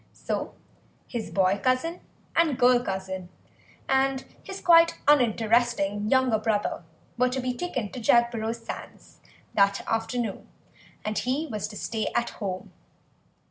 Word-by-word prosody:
So - - -4 0.5
his 235 -3 -4
boy 190 0 +2
cousin 260 +8 0 0.3
and 320 -6 +3
girl 245 -1 +5
cousin 190 -2 -4 0.6
and 265 0 +2 0.2
his 385 0 -7
quite 335 -1 +5
uninteresting 230 -5 +3
younger 260 -4 +3
brother 215 -1 -1 0.4
were 250 0 +4
to 255 +1 -2
be 250 0 -1
taken 250 - -3
to 255 - -6
Jagborough 230 0 +2
sands 230 - -10 0.3
that 200 -1 +2
afternoon 225 -1 -2 0.6
and 215 0 -1
he 265 +5 -1
was 215 -7 -4
to 210 -1 -9
stay 220 +1 -2
at 235 - +1
home. 185 -2 -4
235 Hz, 130 wpm, -26 LUFS, 210-260 Hz, 0.6 s, girl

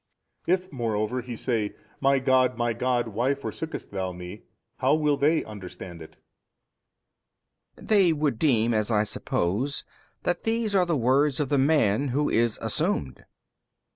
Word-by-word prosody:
If 185 +1 +1
moreover 115 -1 -1
He 120 0 -7
say, 110 -3 -2 0.2
My 135 0 +3
God 130 -1 +2
My 120 -1 0
God 120 0 0
why 120 +6 0
forsookest 155 +3 -6
Thou 95 -2 -3
Me, 90 +3 -9 0.4
how - - +3
will 150 -2 +2
they 155 +3 +2
understand 90 -4 -9
it? 80 - -12 1.6
B. - - -15
They 195 -5 +4
would 150 -7 0
deem, 120 -6 +3
as 110 0 +1
I 105 -2 +3
suppose, 105 +6 -1 0.4
that 175 - 0
these 225 -2 0
are 185 -3 +3
the 165 -3 +1
words 135 +4 +2
of 145 -3 -1
the 145 - +2
man 140 -3 +3
who 145 +3 0
is 115 -1 +2
assumed. 65 -2 -1
A. - - -21
125 Hz, 155 wpm, -26 LUFS, 110-150 Hz, 1.6 s, They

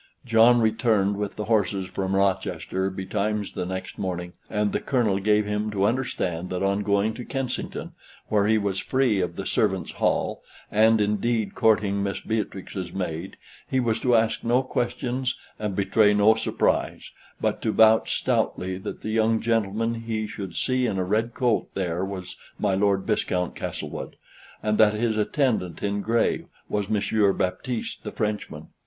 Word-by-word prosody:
John 120 +1 +5
returned 110 -3 +2
with 105 -1 -3
the 105 - -4
horses 100 -3 +1
from 95 +1 -2
Rochester 95 0 0
betimes 100 +2 -2
the 90 - -4
next 95 0 -5
morning, 90 -2 -3 0.2
and 105 -1 0
the - - 0
Colonel 115 -7 +1
gave 105 +1 +3
him 105 +1 -1
to 100 -2 -1
understand 95 -8 -1
that 90 +1 -2
on 100 +1 +1
going 100 +2 +1
to 125 - -7
Kensington, 130 -1 -4 0.4
where 105 -1 +2
he 110 0 +4
was 100 -2 -1
free 130 -7 +1
of 90 - -2
the - - -5
servants' - - 0
hall, - - 0 0.3
and 110 +1 +5
indeed 105 0 0
courting 105 -3 +2
Miss 100 -1 -2
Beatrix's 95 -4 -4
maid, 90 -1 -4 0.3
he 130 - +1
was 115 -2 +1
to 125 0 +3
ask 110 0 +1
no 120 +3 +2
questions, 125 +1 -2 0.2
and 105 -3 -2
betray 105 +2 +3
no 105 +2 +6
surprise, 110 - -1 0.3
but - - -1
to 110 - 0
vouch 110 0 +5
stoutly 95 0 -1
that - - -7
the 110 - -3
young 110 0 +2
gentleman 115 0 0
he 115 -1 -3
should 100 -4 -7
see 130 -1 +1
in 100 -4 -1
a 95 - +1
red 110 +5 0
coat 120 -4 +1
there 90 -2 -1
was 95 -2 -6 0.2
my 100 -2 +1
Lord 100 0 +2
Viscount 90 -4 0
Castlewood, - - -5 0.5
and 105 0 +1
that 110 -1 +6
his 110 0 0
attendant 110 - 0
in 100 0 0
gray 115 +2 +1 0.2
was 105 -1 -2
Monsieur 105 -1 +2
Baptiste 110 +6 -3
the - - -5
Frenchman. 105 -1 -3
105 Hz, 165 wpm, -25 LUFS, 95-115 Hz, 0.5 s, no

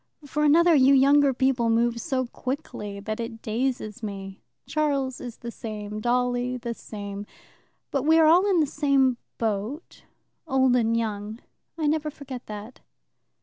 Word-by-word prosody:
For 295 +2 -1
another, 335 +3 +5
you 275 -1 +6
younger 280 +1 +5
people 255 -2 +1
move 235 +1 +1
so 265 -5 -1
quickly 240 -6 -5
that 215 +2 -4
it 230 -1 -6
dazes 235 -1 -2
me. 195 -2 -7 0.2
Charles 280 -4 -1
is 240 -2 -7
the 235 - -7
same, 210 -2 -6
Dolly 245 +1 0
the 235 -1 -4
same. 205 -2 -7 0.6
But 275 - 0
we 315 +3 +4
are 320 - +6
all 355 +6 +5
in 360 -4 +4
the - - +3
same 275 -3 +2 0.2
boat, 225 - -3 0.5
old 265 -3 +3
and 230 -1 +2
young. 215 -1 -3 0.4
I 315 - -1
never 305 0 +1
forget 275 -4 -9
that." 210 +3 -8
250 Hz, 150 wpm, -25 LUFS, 220-280 Hz, 0.6 s, you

